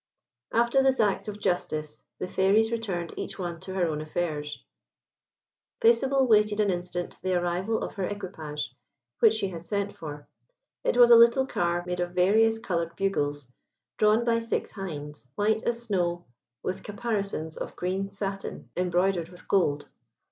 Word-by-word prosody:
After 235 +3 +3
this 265 0 +3
act 205 -2 +1
of 210 0 -5
justice, 155 -5 -2
the 185 - -4
Fairies 200 +5 +3
returned 190 -7 -3
each - - -5
one 175 -3 -4
to 190 +2 -7
her 185 -2 +2
own 155 -2 -2
affairs. 155 -2 -3 1.2
Paisible 265 +3 +4
waited 210 -2 +4
an 205 -2 +3
instant 175 0 -4
the 185 0 0
arrival 180 +5 0
of - - -5
her 195 -3 -2
equipage, 160 -9 -5 0.4
which 220 -1 +6
she 205 -3 -1
had 170 -2 -7
sent 200 +2 -2
for. 150 -2 -8 0.6
It - - +1
was 240 -1 +8
a - - +11
little 235 +3 +6
car 175 -7 0
made 180 0 -3
of 175 0 -2
various 220 +5 +4
coloured 170 -6 -2
bugles, 145 -8 -1 0.5
drawn 215 +2 +4
by 230 -1 +3
six 230 0 -2
hinds, 150 -8 -7
white 215 +1 +2
as 235 0 0
snow, 175 -5 -1 0.4
with 185 - -3
caparisons 200 -7 -3
of - - -6
green 190 +2 -2
satin, 195 0 -5
embroidered 180 -1 +1
with 180 0 -15
gold. 150 -7 +2
190 Hz, 155 wpm, -27 LUFS, 175-220 Hz, 1.2 s, a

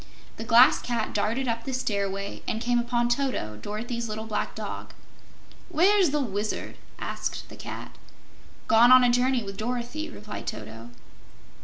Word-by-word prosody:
The - - -5
Glass 235 +2 +6
Cat 235 -3 -2
darted 230 +6 0
up 230 0 -1
the 265 +1 -3
stairway 200 -4 -2
and 220 - -1
came 240 +1 +1
upon 240 0 +1
Toto, 240 - -1
Dorothy's 230 +2 -4
little 215 +1 -4
black 220 -1 -3
dog. - - -6 0.7
"Where's 365 +2 +4
the 295 +1 0
Wizard?" 215 -5 -3 0.2
asked - - -4
the - - -10
Cat. - - -8 0.7
"Gone 235 +2 +6
on 255 0 +9
a 245 - +5
journey 250 0 +2
with 195 -1 -7
Dorothy," 245 +7 -3
replied 210 -7 -8
Toto. 110 +2 -7
235 Hz, 150 wpm, -26 LUFS, 210-255 Hz, 0.7 s, on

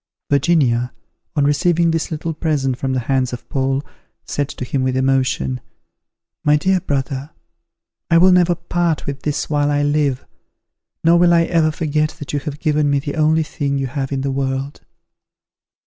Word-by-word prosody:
Virginia, 135 -5 +2 0.4
on 145 - +2
receiving 170 +3 +2
this 165 -1 -1
little 160 +1 -3
present 150 -5 0
from 130 +1 -2
the 130 - 0
hands 130 0 0
of 125 - -7
Paul, 135 +1 0 0.4
said 145 -1 -2
to 125 - -6
him, 135 +1 -1
with 130 0 0
emotion, 130 - 0 0.8
"My 150 0 +4
dear 185 +4 +2
brother, 135 -2 -3 0.8
I 165 - +5
will 185 +2 +6
never 180 -1 +4
part 170 -1 -1
with 140 0 -5
this 150 -1 -2
while 145 -1 +1
I 145 0 +1
live; 145 -3 0 0.8
nor 170 +1 +5
will 175 -1 +5
I 170 - +4
ever 165 -2 +2
forget 155 -1 -1
that 145 - -7
you 145 - +1
have 145 0 -6
given 150 -2 +1
me 140 - +2
the 140 +1 -3
only 160 0 +3
thing 140 -2 -2
you 135 - -1
have 135 +1 -4
in 135 -1 -1
the 135 0 -1
world." 135 +1 -3
145 Hz, 175 wpm, -19 LUFS, 135-160 Hz, 0.8 s, will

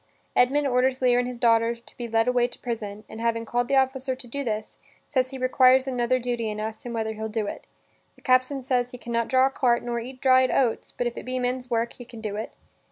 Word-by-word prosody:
Edmund 280 +4 +3
orders 255 0 +2
Lear 245 -1 +4
and 245 - 0
his 250 -1 -5
daughter 230 0 +3
to 235 - -21
be 240 - -5
led 225 +1 +1
away 245 -1 +3
to - - -13
prison, 215 -3 -5
and, 220 - -9
having 230 0 0
called 240 +2 0
the 275 - +1
officer 265 0 +1
to 260 0 -10
do 280 +4 -4
this, 215 -3 -3 0.3
says 255 -1 0
he 265 - -7
requires 255 0 +4
another 255 -1 +1
duty 240 -2 -2
and 210 0 -4
asks 220 0 -5
him 240 - -5
whether 220 -1 -2
he'll 220 0 -5
do 220 -1 -2
it? - - -7 0.5
The - - -23
captain 255 +1 +2
says 245 -1 +1
he 250 - -9
can 235 -1 -7
not 235 0 +1
draw 260 +1 +4
a - - +3
cart 240 -3 +2
nor 240 -1 -2
eat 255 +2 -8
dried 260 -1 +5
oats, 245 -4 0
but 245 - -3
if 240 0 -3
it - - -5
be 255 0 -3
men's 250 0 -2
work 235 -1 0
he 245 - -11
can 235 -1 -11
do 210 -2 -4
it. 215 - -5
245 Hz, 255 wpm, -25 LUFS, 230-255 Hz, 0.5 s, dried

